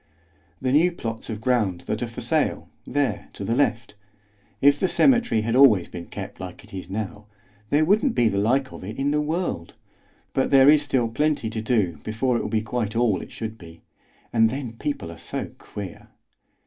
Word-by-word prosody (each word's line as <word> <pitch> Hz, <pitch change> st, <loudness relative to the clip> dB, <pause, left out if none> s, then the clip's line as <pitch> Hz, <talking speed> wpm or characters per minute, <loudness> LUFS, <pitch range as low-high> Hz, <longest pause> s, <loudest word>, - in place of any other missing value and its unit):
"The 130 Hz, -1 st, 0 dB
new 165 Hz, +6 st, +4 dB
plots 115 Hz, -9 st, -5 dB
of 110 Hz, -2 st, -4 dB
ground 110 Hz, -8 st, +1 dB
that -, -, -3 dB
are -, -, -1 dB
for -, -, -8 dB
sale, -, -, 0 dB, 0.2 s
there 145 Hz, -1 st, -1 dB
to -, -, -7 dB
the 115 Hz, -, 0 dB
left. 115 Hz, -5 st, 0 dB, 0.7 s
If 140 Hz, +3 st, +5 dB
the 190 Hz, -, +2 dB
cemetery 240 Hz, -, +3 dB
had 115 Hz, +2 st, -1 dB
always 115 Hz, -10 st, +6 dB
been 85 Hz, -1 st, -8 dB
kept -, -, -8 dB
like 90 Hz, +1 st, -8 dB
it 105 Hz, -, -17 dB
is 95 Hz, -2 st, -7 dB
now, 105 Hz, +1 st, -5 dB, 0.4 s
there 150 Hz, +2 st, +3 dB
wouldn't 215 Hz, -, +3 dB
be 120 Hz, -, +4 dB
the 100 Hz, -2 st, +1 dB
like 130 Hz, +6 st, +1 dB
of -, -, -9 dB
it 105 Hz, +4 st, -7 dB
in 140 Hz, +1 st, +1 dB
the 150 Hz, 0 st, +2 dB
world; 155 Hz, -, -3 dB, 0.6 s
but 130 Hz, -, +1 dB
there 135 Hz, +1 st, +7 dB
is 150 Hz, -1 st, +5 dB
still 130 Hz, -5 st, +1 dB
plenty 140 Hz, -1 st, 0 dB
to 110 Hz, -, -3 dB
do 105 Hz, -9 st, 0 dB
before 120 Hz, +4 st, 0 dB
it -, -, +1 dB
will -, -, -3 dB
be 110 Hz, -1 st, 0 dB
quite 110 Hz, -1 st, -2 dB
all 115 Hz, -4 st, +2 dB
it -, -, -10 dB
should 110 Hz, 0 st, -6 dB
be. 85 Hz, -1 st, -13 dB, 0.5 s
And 115 Hz, -1 st, +5 dB
then 130 Hz, -2 st, -5 dB
people 115 Hz, -, -4 dB
are 85 Hz, -, -11 dB
so -, -, -5 dB
queer!" 100 Hz, -3 st, -8 dB
115 Hz, 200 wpm, -24 LUFS, 105-140 Hz, 0.7 s, there